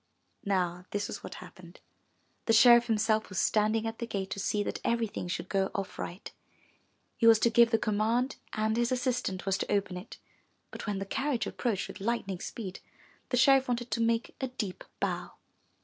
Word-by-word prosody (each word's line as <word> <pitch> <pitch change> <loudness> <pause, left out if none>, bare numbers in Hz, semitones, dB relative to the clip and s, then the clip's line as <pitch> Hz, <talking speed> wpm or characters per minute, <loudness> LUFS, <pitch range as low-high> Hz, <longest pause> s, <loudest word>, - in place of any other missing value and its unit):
Now 180 -2 0
this 205 0 -2
was - - -7
what - - -7
happened. - - -12 0.7
The 225 - +4
sheriff 240 +1 +7
himself 220 -1 +1
was 185 - -7
standing 215 +3 +2
at 225 0 -4
the 235 - -3
gate 195 -3 -3
to 200 - -3
see 205 +1 0
that - - -4
everything 230 -6 -1
should 175 - -3
go 195 -1 +1
off 195 -1 -4
right. 180 +3 -6 0.9
He 230 - +4
was 225 -1 +8
to 235 - +4
give 235 0 +6
the 225 - +3
command 220 +5 0 0.2
and 215 0 0
his 240 +1 +1
assistant 250 -7 -1
was 190 -1 +1
to - - -3
open 195 -3 0
it. 180 +5 -9 0.5
But - - -7
when 205 -1 -1
the 195 - -3
carriage 260 0 -1
approached 220 -4 -2
with - - -9
lightning 200 -4 -2
speed, 195 -3 -6 0.5
the 250 - +1
sheriff 270 +2 +5
wanted 240 0 -2
to 230 - 0
make 230 +2 0
a 265 - 0
deep 220 -7 -5 0.2
bow. - - -2
220 Hz, 190 wpm, -30 LUFS, 195-235 Hz, 0.9 s, was